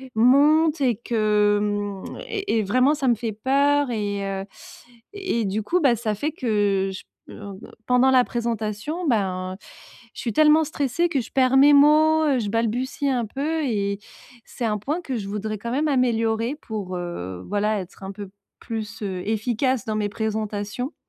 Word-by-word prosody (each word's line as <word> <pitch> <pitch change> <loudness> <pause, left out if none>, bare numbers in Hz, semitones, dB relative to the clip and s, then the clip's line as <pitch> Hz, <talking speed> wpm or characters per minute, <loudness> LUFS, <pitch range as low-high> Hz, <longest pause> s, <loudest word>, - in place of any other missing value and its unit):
monte 295 +7 +4
et 250 -4 +2
que, 210 -3 +2
mmh 205 -2 -3
et 400 - -1
et - - 0
vraiment 255 +8 +3
ça 280 -3 -2
me 240 - +4
fait 225 0 -4
peur 280 +4 +2
et 205 -3 -2
heu, 195 0 -3 0.7
et 375 - -2
du 200 +2 -1
coup 355 - +1
bah 265 -6 +4
ça 215 -2 -2
fait 290 +10 -2
que 205 - 0
j 190 - -8 0.2
p - - -11
en, 200 -1 -9
heu, - - -13 0.3
pendant 250 +1 +4
la 255 -1 +5
présentation. 235 - -3
Ben 185 -6 -1 0.6
je - - -7
suis 235 - -2
tellement 310 +4 +5
stressée 300 +3 -1
que 285 - 0
je 225 - -11
perds 260 0 +3
mes 285 +2 +7
mots, 310 +2 +5
heu, 275 -4 +2
je 210 -3 -2
balbutie 235 +6 -1
un 245 -3 0
peu. 300 +8 -2
Et 200 -5 -1 0.5
c'est 245 - -5
un 210 -2 0
point 300 - -3
que 265 -7 -4
je 200 - -5
voudrais 215 +1 -3
quand 235 +3 -5
même 290 +5 0
améliorer 230 -1 +1
pour, 200 -5 -5
heu, 95 - -6
voilà, 210 +1 0
être 185 +2 -12
un 190 - -5
peu 200 0 -8 0.3
plus, 225 -1 -6
heu 190 -3 -3
efficace 235 +3 0
dans 215 - -2
mes 210 -1 -1
présentations. 215 +3 -3
230 Hz, 180 wpm, -23 LUFS, 205-275 Hz, 0.7 s, mes